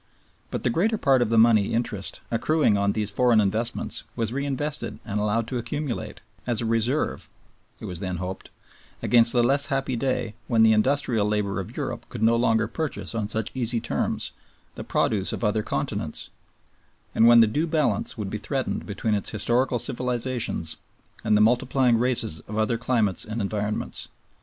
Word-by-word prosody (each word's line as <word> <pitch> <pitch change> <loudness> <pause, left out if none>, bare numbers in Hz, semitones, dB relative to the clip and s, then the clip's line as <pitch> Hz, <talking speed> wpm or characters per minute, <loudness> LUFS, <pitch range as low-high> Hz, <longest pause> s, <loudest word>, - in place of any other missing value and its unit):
But - - -4
the 120 - +1
greater 215 - +1
part 135 -7 +3
of 120 - +1
the 115 - +2
money 110 -2 +4
interest 115 -5 -3
accruing 120 0 +2
on 100 0 +1
these 105 -2 -1
foreign 120 +1 +3
investments 110 +4 0
was 115 0 -2
reinvested 140 +2 -3
and 105 -2 -2
allowed 105 +2 0
to 125 - -2
accumulate, 120 -3 -4 0.3
as 120 -3 +1
a 115 - -1
reserve 115 +6 0 0.5
(it - - -8
was 90 - -4
then 90 -2 -3
hoped) 95 +2 -6 0.5
against 115 -1 +5
the 120 -1 +4
less 140 +3 +2
happy 135 -2 -1
day 120 -2 -1
when 115 -2 +4
the 110 - +6
industrial 120 -2 +2
labor 105 -2 -1
of 95 - -7
Europe - - -4
could 110 - -5
no 115 +1 +5
longer 115 -2 +2
purchase 155 +1 -3
on 110 -3 -2
such 110 +1 0
easy 120 -2 -1
terms 115 - -2 0.4
the - - -7
produce 100 -3 0
of - - -5
other 105 0 +1
continents, - - -3 0.8
and 115 - +5
when 120 0 +8
the 115 - +8
due 150 +10 -1
balance 150 -10 0
would 100 -3 -4
be 105 - -3
threatened 130 +5 -3
between 105 +1 -1
its 100 - 0
historical 120 +4 +1
civilizations 125 - -1 0.5
and 110 -1 +3
the - - +4
multiplying 125 +1 +3
races 115 -9 +1
of 105 - -5
other 110 +2 +1
climates 115 -7 +1
and 110 +2 -5
environments. 105 +1 -2
115 Hz, 175 wpm, -25 LUFS, 105-125 Hz, 0.8 s, when